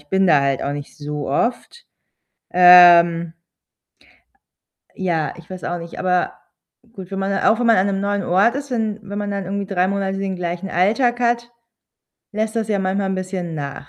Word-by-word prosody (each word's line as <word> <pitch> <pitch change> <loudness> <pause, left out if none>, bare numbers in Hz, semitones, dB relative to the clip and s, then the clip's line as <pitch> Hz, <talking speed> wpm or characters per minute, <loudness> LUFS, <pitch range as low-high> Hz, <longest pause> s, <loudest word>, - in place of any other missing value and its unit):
ich 145 - -25
bin 190 +2 +2
da 150 -5 +4
halt 140 -1 -1
auch 140 - -2
nicht 145 0 -8
so 150 -1 -6
oft. 245 - -2 0.7
Ähm 175 -2 +6 1.6
ja, 170 -5 -2
ich 170 -1 -15
weiß 185 -1 -9
auch 175 - -3
nicht, 170 0 -10
aber 180 -1 0 0.6
gut, 190 -5 -10
wenn 195 - -4
man 195 0 -1
auch 220 - +2
wenn 245 - 0
man 230 - +5
an 190 +2 +2
'nem 195 -1 -2
neuen 200 0 -1
Ort 195 +8 +2
ist, 280 0 -5
wenn 220 -3 -2
wenn 205 +1 -7
man 205 0 -3
dann 200 -2 -4
irgendwie 200 +1 -3
3 180 -1 +1
Monate 195 0 -2
den 195 -1 -3
gleichen 175 +1 -5
Alltag 230 +8 +1
hat, 235 0 -1 0.8
lässt 220 +1 -3
das 220 -1 -2
ja 205 -2 0
manchmal 195 +1 -1
'n - - -1
bisschen 185 -2 -5
nach. 145 -1 -7
190 Hz, 190 wpm, -20 LUFS, 175-205 Hz, 1.6 s, Ähm